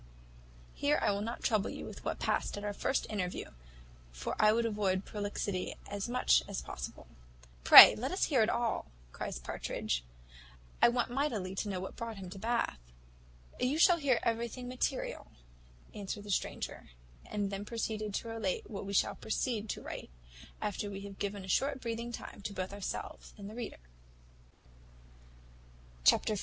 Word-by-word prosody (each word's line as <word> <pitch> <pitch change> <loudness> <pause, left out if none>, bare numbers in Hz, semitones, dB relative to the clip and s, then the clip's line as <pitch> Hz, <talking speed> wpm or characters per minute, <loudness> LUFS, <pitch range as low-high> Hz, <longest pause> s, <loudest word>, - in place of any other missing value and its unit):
Here 290 +1 +2
I - - +2
will 200 0 -1
not 230 +3 -4
trouble 215 -3 +2
you - - -6
with - - -9
what - - -2
past - - -1
at 205 - -6
our 205 0 -2
first 265 +6 0
interview; 185 -4 -3 0.6
for - - -4
I 215 0 +6
would 230 +1 +2
avoid 200 -4 0
prolixity 205 -2 -3
as 200 +2 -4
much 250 +1 +4
as 200 -2 -4
possible." - - -7 0.6
"Pray - - +12
let 255 +4 -2
us 375 - 0
hear 260 -7 +4
all," 235 -2 0 0.2
cries - - -4
Partridge; - - -3 0.8
"I - - +8
want 240 0 0
mightily 240 -9 -1
to 205 +2 -2
know 190 -2 -2
what 190 - -6
brought 230 -2 -5
him 185 -2 -8
to 195 - -8
Bath." 230 - 0 0.8
"You 260 +4 +1
shall 345 +1 +6
hear 280 -6 +2
everything 235 +2 -2
material," 255 +1 -2 0.7
answered 205 0 -5
the 205 - -5
stranger; - - -3 0.4
and 205 -1 -2
then 195 0 -3
proceeded 215 -2 -3
to - - -3
relate 225 -4 -2
what 195 -2 -5
we 200 - -4
shall - - +3
proceed 220 -1 -2
to - - -4
write, - - -7 0.5
after 205 -1 -2
we 195 -1 -6
have 200 -1 -9
given 200 -1 -3
a - - -11
short 270 +8 +1
breathing 235 0 -4
time 225 - -8
to 200 0 -5
both 190 0 -4
ourselves 200 -2 -6
and 200 -1 -8
the 210 - -8
reader. 235 0 -6 2.3
Chapter 70 - +5
xiv. 205 - -2
210 Hz, 170 wpm, -33 LUFS, 195-235 Hz, 2.3 s, Pray